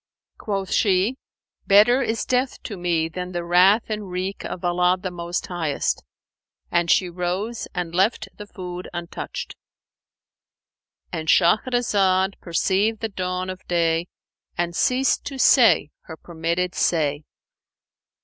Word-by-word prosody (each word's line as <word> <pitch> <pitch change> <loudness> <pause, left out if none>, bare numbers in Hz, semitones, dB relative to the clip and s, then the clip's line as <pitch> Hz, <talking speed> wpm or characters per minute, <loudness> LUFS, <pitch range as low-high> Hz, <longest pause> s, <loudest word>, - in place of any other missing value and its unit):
Quoth 195 -3 -3
she, 200 +5 +2 0.5
'Better 215 +6 +6
is 225 -3 -1
death 255 +1 0
to 210 - -6
me 170 -3 0
than 180 +2 -6
the 175 0 -2
wrath 185 +6 +5
and 210 -3 -4
wreak 185 +2 -4
of 180 - -6
Allah 180 +1 +2
the 185 0 -4
Most 175 0 -4
Highest;' 165 -5 -2 0.7
and 175 0 +1
she 185 - +4
rose 180 +6 -3
and 175 -2 -3
left 200 +4 +1
the 210 - -10
food 180 -2 -7
untouched"—And 170 -1 -10
Shahrazad 195 0 +2
perceived 195 +5 0
the 225 - -2
dawn 185 -1 -3
of 185 - -10
day 165 -1 +1 0.5
and 175 0 -1
ceased 255 +7 +2
to 275 - -5
say 240 - +5
her 160 - -9
permitted 170 +2 -2
say. 150 -3 0
180 Hz, 125 wpm, -23 LUFS, 175-210 Hz, 0.7 s, Better